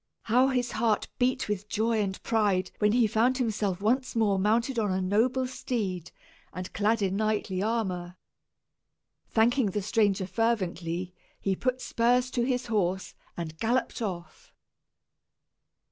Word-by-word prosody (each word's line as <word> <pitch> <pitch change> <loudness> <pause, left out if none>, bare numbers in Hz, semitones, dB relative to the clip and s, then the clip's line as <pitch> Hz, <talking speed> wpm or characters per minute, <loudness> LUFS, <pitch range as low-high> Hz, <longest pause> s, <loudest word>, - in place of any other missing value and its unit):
How 250 +4 +4
his 250 -2 0
heart 220 -1 0
beat 255 +1 +1
with 210 0 -3
joy 220 0 +1
and 190 -2 -2
pride 205 -5 +1
when 210 0 +3
he 240 -1 +4
found 230 +4 +2
himself 210 -6 -1
once 255 +5 +1
more 205 -4 +2
mounted 230 +5 +1
on 210 -3 0
a 185 - 0
noble 225 +8 +1
steed, 205 -9 -3 0.4
and 185 0 -7
clad 215 +1 +1
in 190 0 0
knightly 215 -3 0
armor! 185 -5 -2 1.1
Thanking 235 +2 +3
the 205 +2 -2
stranger 205 -2 +2
fervently, 185 -4 -1 0.3
he 195 -1 0
put 255 +4 -1
spurs 245 +2 +1
to 245 - 0
his 250 0 0
horse, 190 -4 -1 0.2
and 160 -2 -6
galloped 240 +2 0
off. 175 -7 -6
215 Hz, 140 wpm, -28 LUFS, 190-235 Hz, 1.1 s, How